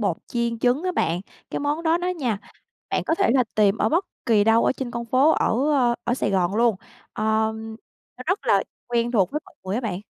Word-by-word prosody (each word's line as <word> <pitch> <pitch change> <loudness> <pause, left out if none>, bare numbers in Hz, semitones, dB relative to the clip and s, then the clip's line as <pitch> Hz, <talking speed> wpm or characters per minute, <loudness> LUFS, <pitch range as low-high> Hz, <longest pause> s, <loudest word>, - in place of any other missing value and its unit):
bột 195 -6 0
chiên 235 -1 -2
trứng 250 +7 +2
á 365 0 -1
bạn. 170 - 0 0.3
Cái - - -2
món 295 +3 -1
đó 330 +1 +2
đó 360 +1 -2
nha, 260 - -1 0.5
bạn - - 0
có 325 - +2
thể 230 - +2
là 255 -2 +4
tìm 210 -1 +3
ở - - +2
bất 345 +5 +1 0.2
kỳ 210 -3 +4
đâu 225 +1 +4
ở - - +3
trên 260 -2 -5
con 235 0 -4
phố 260 +6 +4
ở, 275 +2 +1
ơ, 245 -4 +3
ở 240 - +1
Sài 210 - -1
Gòn 185 0 +1
luôn. 230 -3 +3 0.4
Ờm, 220 +1 -1 0.4
nó 255 - -8
rất 375 +4 -1
là - - +4 0.2
quen 240 0 0
thuộc 195 -7 +2
với 300 - -2
mọi - - -19
người 190 +1 -3
á 235 - 0
bạn. 200 -6 -3
235 Hz, 235 wpm, -23 LUFS, 220-275 Hz, 0.5 s, là